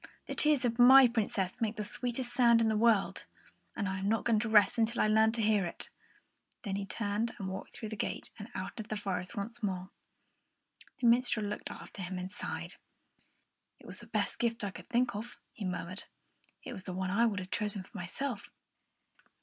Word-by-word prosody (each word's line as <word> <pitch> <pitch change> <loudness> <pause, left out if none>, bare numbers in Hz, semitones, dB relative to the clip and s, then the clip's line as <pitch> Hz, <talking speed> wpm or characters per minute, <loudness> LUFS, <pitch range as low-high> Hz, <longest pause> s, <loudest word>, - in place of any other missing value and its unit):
"The - - -5
tears 300 -4 +3
of 235 0 -1
my 260 +2 +9
Princess 205 -5 -1
make 220 -1 0
the 215 - -3
sweetest 240 +3 -3
sound 235 -2 +5
in 230 - +3
the 220 -1 +2
world, 220 -2 +2 0.5
and 205 - -1
I 190 0 -2
am 195 +1 -1
not 225 0 +1
going 225 -2 +3
to 220 +1 -2
rest 210 +1 +5
until 230 +1 +1
I - - +4
learn 220 +1 +5
how - - -3
to 235 - -1
hear 210 -2 +3
it." 170 - -5 0.7
Then 200 -4 -2
he 200 0 -3
turned 210 +2 -2
and 195 - -4
walked 190 0 -6
through 220 - -6
the 220 - -5
gate - - -4
and 205 +3 -8
out 185 - -4
into 220 -2 -6
the 215 - -2
forest 185 -1 -3
once 225 +4 -5
more. 185 -2 -3 1.1
The 260 - -2
minstrel 235 -2 +4
looked 205 +1 -4
after 200 - -9
him 185 +1 -4
and 180 +1 -5
sighed. - - -6 1.0
"It - - -19
was - - -9
the - - -13
best - - -1
gift 235 -1 0
I 200 - -2
could - - -12
think 245 -1 +2
of," 225 +4 -6 0.2
he 210 - -6
murmured; 185 +2 -4 0.6
"it - - -6
was 195 - -7
the 185 - -5
one 185 0 -2
I 230 +4 +4
would 210 -3 -1
have 185 -1 -5
chosen 210 -3 -1
for - - -21
myself. 210 +5 -4
215 Hz, 215 wpm, -32 LUFS, 195-235 Hz, 1.1 s, my